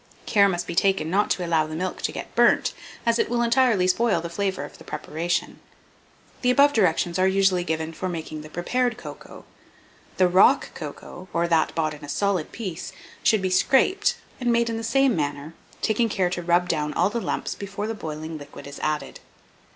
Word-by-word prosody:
Care 200 Hz, -2 st, +4 dB
must 175 Hz, -2 st, -2 dB
be -, -, -5 dB
taken 190 Hz, -3 st, +1 dB
not 205 Hz, +3 st, +2 dB
to 180 Hz, -, 0 dB
allow 160 Hz, -2 st, +2 dB
the 155 Hz, -, -6 dB
milk 185 Hz, +3 st, -3 dB
to -, -, -1 dB
get -, -, -7 dB
burnt, -, -, +3 dB, 0.3 s
as 230 Hz, 0 st, +2 dB
it -, -, +1 dB
will 240 Hz, 0 st, +1 dB
entirely 235 Hz, -5 st, +3 dB
spoil 195 Hz, 0 st, +2 dB
the 170 Hz, +1 st, -6 dB
flavour 190 Hz, +1 st, -2 dB
of -, -, -13 dB
the -, -, -12 dB
preparation. 170 Hz, +3 st, -3 dB, 0.8 s
The 250 Hz, -, +2 dB
above 280 Hz, +3 st, +5 dB
directions 175 Hz, -, +1 dB
are 185 Hz, -, +4 dB
usually 190 Hz, -2 st, +3 dB
given 160 Hz, -1 st, -3 dB
for 185 Hz, +3 st, -4 dB
making 160 Hz, -3 st, -5 dB
the 155 Hz, -, -11 dB
prepared 240 Hz, +8 st, -1 dB
cocoa. -, -, -11 dB, 0.7 s
The 185 Hz, -, +5 dB
rock 180 Hz, +2 st, +4 dB
cocoa, 185 Hz, +1 st, -9 dB
or 170 Hz, +1 st, +1 dB
that 165 Hz, -2 st, +2 dB
bought 155 Hz, -2 st, 0 dB
in 150 Hz, 0 st, -12 dB
a 145 Hz, -, -8 dB
solid 190 Hz, +1 st, 0 dB
piece, 190 Hz, -4 st, -6 dB, 0.3 s
should 215 Hz, -4 st, +3 dB
be 185 Hz, -, 0 dB
scraped, 280 Hz, -, +3 dB, 0.2 s
and 245 Hz, -2 st, +1 dB
made 235 Hz, 0 st, +2 dB
in 225 Hz, -, -3 dB
the 225 Hz, -, -5 dB
same 265 Hz, +1 st, +3 dB
manner, 145 Hz, 0 st, -3 dB, 0.3 s
taking 225 Hz, +1 st, +2 dB
care 185 Hz, -4 st, 0 dB
to 180 Hz, -, -2 dB
rub 175 Hz, +1 st, +2 dB
down 150 Hz, -3 st, -1 dB
all 180 Hz, +4 st, +2 dB
the 235 Hz, -, -2 dB
lumps -, -, -2 dB
before 200 Hz, +1 st, -5 dB
the 225 Hz, -, -2 dB
boiling 155 Hz, -4 st, -6 dB
liquid 145 Hz, 0 st, -11 dB
is 140 Hz, 0 st, -9 dB
added. 155 Hz, -1 st, -3 dB
185 Hz, 200 wpm, -24 LUFS, 165-225 Hz, 0.8 s, above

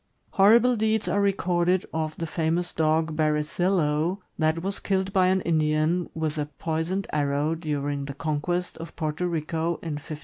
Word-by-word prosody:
Hor 200 Hz, +4 st, +7 dB
rible 250 Hz, +1 st, +2 dB
deeds 220 Hz, 0 st, +1 dB
are 205 Hz, -, +1 dB
recorded 180 Hz, -2 st, +1 dB
of 155 Hz, -1 st, -2 dB
the 165 Hz, -, -3 dB
famous 165 Hz, +2 st, -1 dB
dog, 160 Hz, 0 st, +1 dB
Berezillo, 155 Hz, +2 st, +1 dB, 0.2 s
that 160 Hz, +1 st, +1 dB
was 195 Hz, +1 st, -2 dB
killed 190 Hz, -1 st, -1 dB
by 185 Hz, -2 st, +4 dB
an 190 Hz, 0 st, +2 dB
Indian 155 Hz, +1 st, +1 dB
with 155 Hz, -1 st, -2 dB
a 145 Hz, -, -1 dB
poisoned 160 Hz, +6 st, -2 dB
arrow 145 Hz, +1 st, +1 dB
during 145 Hz, -3 st, -2 dB
the 140 Hz, -1 st, -6 dB
conquest 160 Hz, +4 st, -2 dB
of 165 Hz, -, -8 dB
Porto 155 Hz, +2 st, -2 dB
Rico, 165 Hz, 0 st, -1 dB
in 155 Hz, -3 st, -3 dB
1514. 155 Hz, +1 st, -7 dB
160 Hz, 165 wpm, -26 LUFS, 155-180 Hz, 0.2 s, Hor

